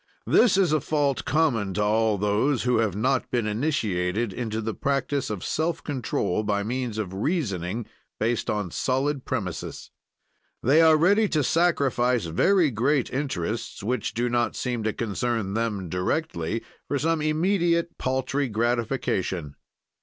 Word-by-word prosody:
This 220 -6 +4
is 180 -6 +3
a 155 - +2
fault 145 -2 0
common 120 - +1
to 105 - +1
all 110 0 +2
those 105 +7 +1
who 125 -1 +2
have 110 -5 +1
not 130 +5 0
been 120 -3 0
initiated 105 - -1
into 110 -1 -3
the 110 0 -3
practise 140 +2 -1
of 105 -4 -4
self 165 +1 -1
control 115 - -1
by 105 -1 0
means 120 0 -3
of 100 -4 -3
reasoning 105 - -2 0.3
based 115 +1 0
on 105 -5 -1
solid 135 - -1
premises. 100 -9 -4 0.7
They 145 +6 +5
are 160 -1 +6
ready 200 +6 +4
to 150 -2 +1
sacrifice 125 - +2
very 160 - +3
great 130 +4 +1
interests, 115 - -3
which 115 -1 -2
do 120 +2 0
not 120 0 0
seem 120 -2 -2
to 110 - +2
concern 115 -2 -2
them 105 -4 -1
directly, 90 - -2 0.2
for 145 - 0
some 160 +2 0
immediate 170 +2 +1
paltry 130 +1 -1
gratification. 110 - -1
120 Hz, 145 wpm, -25 LUFS, 105-145 Hz, 0.7 s, are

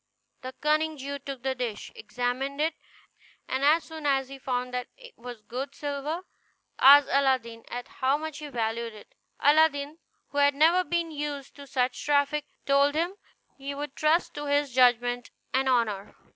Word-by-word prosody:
The 255 0 -7
cunning 310 +1 +1
Jew 280 +1 -5
took 270 -2 -8
the 265 0 0
dish, 245 -5 -5
examined 270 - -3
it, 315 +2 +1 0.7
and 260 +1 -2
as 310 +3 +5
soon 315 -2 -6
as 270 -2 +1
he 275 0 -9
found 250 -1 -2
that 250 0 -3
it - - -14
was 240 -2 -10
good 260 +6 -5
silver 290 +3 -3 0.6
asked 280 +1 +8
Aladdin 255 -4 +1
at 245 0 -5
how 265 +2 0
much 310 -1 -6
he 300 - -7
valued 230 -3 -3
it. 210 - -15 0.3
Aladdin, 295 0 +3 0.3
who 285 - -2
had 285 0 +4
never 330 +5 +5
been 340 -2 -1
used 290 -2 -5
to 280 -1 -11
such 255 -2 -1
traffic, 290 0 +1 0.2
told 280 +1 +3
him 340 +4 0 0.5
he 280 +1 -5
would 290 -1 -6
trust 310 +3 +2
to 295 0 -5
his 285 -2 +1
judgment 245 -1 +3 0.2
and 265 +1 +2
honor. 220 -6 0
280 Hz, 170 wpm, -27 LUFS, 250-295 Hz, 0.7 s, asked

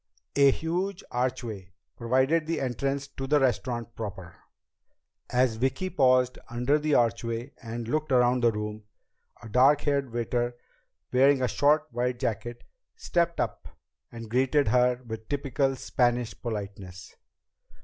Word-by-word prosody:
A 140 -1 +6
huge 175 +6 -2
archway 120 -7 -3 0.2
provided 130 +7 +1
the 165 -1 -1
entrance 135 +2 -2
to 135 -1 -6
the 150 +1 +4
restaurant 120 -2 -1
proper. 95 -6 -7 0.9
As 125 -2 +2
Vicki 135 +10 -1
paused 130 -2 +3
under 125 +5 +1
the 150 -1 +1
archway 115 +2 0
and 115 -1 -6
looked 155 +3 -1
around 125 0 +3
the 120 - +5
room, 105 0 -5 0.6
a - - -8
dark 130 +6 +4
haired 140 -3 0
waiter, 120 +1 -1 0.6
wearing 135 +1 +4
a - - +3
short 150 +4 +3
white 125 +1 -1
jacket, 120 +1 -3 0.3
stepped 170 - 0
up - - -3 0.4
and 115 -1 -8
greeted 130 +3 +2
her 125 +1 +2
with 110 -1 -7
typical 135 -1 0
Spanish 120 -3 0
politeness. 100 -5 -6
125 Hz, 130 wpm, -27 LUFS, 115-140 Hz, 0.9 s, A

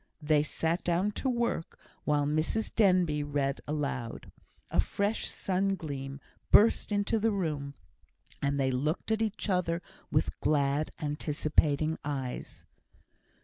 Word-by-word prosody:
They 150 -1 +3
sat 160 +3 -1
down 180 +4 +1
to 265 - +1
work, 235 -9 -1 0.3
while 145 -1 +2
Mrs 155 +9 0
Denbigh 180 -8 +3
read 140 -1 -1
aloud. 140 -6 -3 0.4
A - - 0
fresh 205 +2 0
sun 195 +1 0
gleam 140 -5 -6 0.3
burst 220 0 +5
into 205 +2 +1
the 225 +2 +2
room, 150 -8 -2 0.7
and 140 0 0
they 135 -1 +2
looked 150 +11 -1
at 220 0 +1
each 220 -1 -1
other 180 -3 +1 0.3
with - - 0
glad, 145 0 +1
anticipating 150 0 +1
eyes. 135 -4 -5
155 Hz, 125 wpm, -30 LUFS, 145-195 Hz, 0.7 s, burst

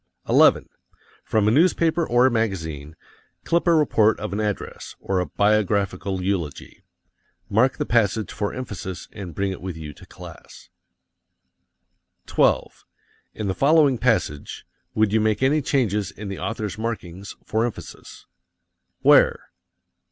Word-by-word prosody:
11. - - +4 0.6
From 105 -1 +1
a - - +4
newspaper 165 +3 +3
or 120 +1 +4
a 130 - +4
magazine, 80 -10 -3 0.5
clip 170 +1 0
a 170 - +5
report 110 -8 +3
of 105 -1 -5
an 100 - -2
address, 105 -2 -4
or 95 -1 -1
a 90 - -2
biographical 100 -2 0
eulogy. 90 -7 -4 0.7
Mark 125 +6 +3
the - - -2
passage 110 -2 +1
for 105 -1 -3
emphasis 95 -8 -7
and 95 -7 -8
bring 100 0 -1
it 95 - -7
with 90 -3 -6
you 75 -2 -8
to - - -16
class. - - -13 1.6
12. - - +1 0.5
In 105 - -4
the 95 - 0
following 140 0 +3
passage, 110 - -1 0.3
would 110 -1 +2
you 110 - +3
make 110 +3 0
any 150 +3 +3
changes 105 -8 0
in 100 +1 -8
the 95 - -6
author's 110 -2 -4
markings 100 -4 -5
for 110 +2 0
emphasis? 120 -2 -7 0.8
Where? - - +4
105 Hz, 135 wpm, -23 LUFS, 95-120 Hz, 1.6 s, a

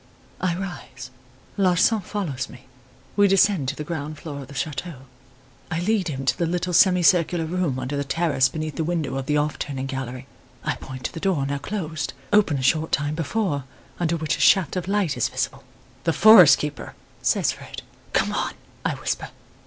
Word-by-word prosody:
"I 180 -2 0
rise; 170 -9 -7 0.5
Larsan 195 +3 +3
follows 160 -10 -4
me; 125 - -14 0.5
we 205 -1 +5
descend 195 -6 +3
to 140 - -1
the 150 - -5
ground 150 -1 -5
floor 145 -3 -7
of 135 - -10
the 140 - -12
chateau. 150 -1 -4 0.7
I 165 -1 -1
lead 205 -1 +1
him 135 -4 -4
to - - +2
the 170 - -1
little 180 +1 -2
semi 180 +1 +5
circular 170 -1 +3
room 165 -5 -1
under 130 +2 -3
the 140 - -1
terrace 140 -3 +1
beneath 155 -1 -5
the 160 - 0
window 160 -5 -2
of 135 -1 -4
the 150 - +2
'off 150 0 -1
turning' 135 -2 -3
gallery. 130 -1 -5 0.4
I - - 0
point 130 -1 -9
to - - -3
the 165 - -6
door, 170 -7 0
now 140 0 -2
closed, 160 -2 -4 0.2
open 200 -9 +4
a 130 - -3
short 155 +4 +2
time 145 +1 0
before, 165 -3 -1 0.3
under 170 -1 0
which 155 -1 -1
a - - -4
shaft 190 -6 +4
of 180 -1 -3
light 195 -6 +1
is 120 - +1
visible. - - -3 0.4
"'The 165 - +2
forest 205 -6 +8
keeper!' 150 0 -5 0.3
says - - +2
Fred. - - -9 0.3
"'Come - - +1
on!' - - -2 0.3
I - - 0
whisper. - - -3
160 Hz, 190 wpm, -24 LUFS, 140-180 Hz, 0.7 s, forest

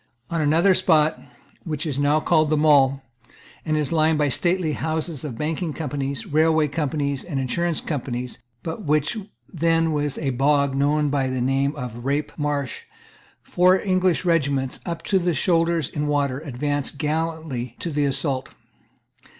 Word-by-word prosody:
On 165 -1 0
another 165 +6 +4
spot, 160 -4 +2 0.4
which 155 -1 -3
is 145 -3 -2
now 145 +2 +3
called 155 0 +2
the 155 - +2
Mall, 140 -3 +4 0.6
and 155 -1 0
is 150 -3 -1
lined 160 -1 +3
by 150 - +2
the 140 - 0
stately 175 +1 0
houses 160 -1 -3
of 135 -7 -5
banking 160 +2 -2
companies, 140 -3 -3
railway 155 0 +2
companies, 140 -2 -2
and 145 -6 -3
insurance 165 +6 -1
companies, 125 -4 -4 0.2
but 165 +5 -5
which 150 +3 +1
was 210 -3 -7 0.3
then 165 -1 +2 0.2
a 140 - -1
bog 140 +2 +2
known 145 +2 +2
by 135 -2 +1
the 130 0 -2
name 135 +3 +1
of 125 -5 -5
the 120 - -9
Rape 140 +4 -1
Marsh, 145 -4 -3 0.6
four 185 +1 +3
English 185 -2 +1
regiments, 140 -6 +1
up 170 -1 -4
to 195 - +2
the 175 -2 0
shoulders 165 -4 +2
in 150 -1 -3
water, 140 -3 0
advanced 145 0 -3
gallantly 155 -5 -3
to 170 - -4
the 145 -1 +1
assault. 135 -1 -2
150 Hz, 160 wpm, -23 LUFS, 140-165 Hz, 0.6 s, another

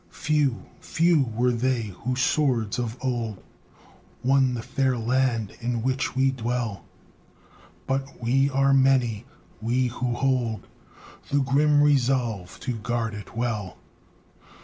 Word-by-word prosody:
Few, 150 -5 0
few 165 -4 +2
were 125 +2 +2
they 120 -3 -1
whose 125 +2 -1
swords 125 -5 +1
of 120 0 -3
old 120 -6 -3 0.8
Won 130 -1 +3
the 115 - -5
fair 130 0 0
land 120 -2 0
in 120 -1 -2
which 130 +2 -1
we 135 0 +3
dwell, 120 -4 -3 1.0
But 135 +1 -3
we 135 +4 +2
are 135 0 +3
many, 130 -4 +2 0.3
we 125 +3 +1
who 120 0 -2
hold 125 -4 0 0.6
The 145 0 +2
grim 145 +2 +3
resolve 125 -9 +1
to 125 -3 -3
guard 115 +1 -2
it 105 +2 -9
well. 110 -6 -2
125 Hz, 125 wpm, -25 LUFS, 115-135 Hz, 1.0 s, Won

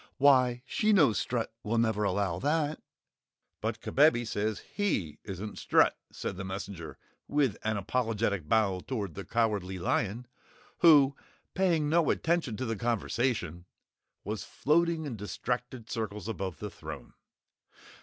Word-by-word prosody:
Why 130 -3 +4
she 215 +8 +2
knows 150 - +5
Strut 115 -2 -2
will 115 +2 -1
never 110 -2 +2
allow 95 -3 0
that." 150 +4 0 0.8
"But - - -2
Kabebe 135 -4 +4
says 110 -1 -2
HE 95 - -1
isn't 100 +2 -6
Strut!" - - +4 0.2
said - - -5
the 95 - -4
messenger 95 -3 -6 0.3
with 140 -6 +2
an 110 -1 0
apologetic 105 -5 -1
bow 100 -4 +3
toward 100 -5 -4
the 100 - -6
Cowardly 105 -5 0
Lion, 105 +6 -1 0.5
who, 145 -4 +7 0.4
paying 170 -6 +2
no 165 +1 +3
attention 160 -10 0
to 130 - -2
the 115 -1 -1
conversation, 115 -5 -1 0.6
was 105 0 -4
floating 165 +2 +1
in 125 -6 -5
distracted 115 +4 -4
circles 105 -3 -4
above 95 -7 -4
the - - -6
throne. - - -9
115 Hz, 135 wpm, -30 LUFS, 100-140 Hz, 0.8 s, who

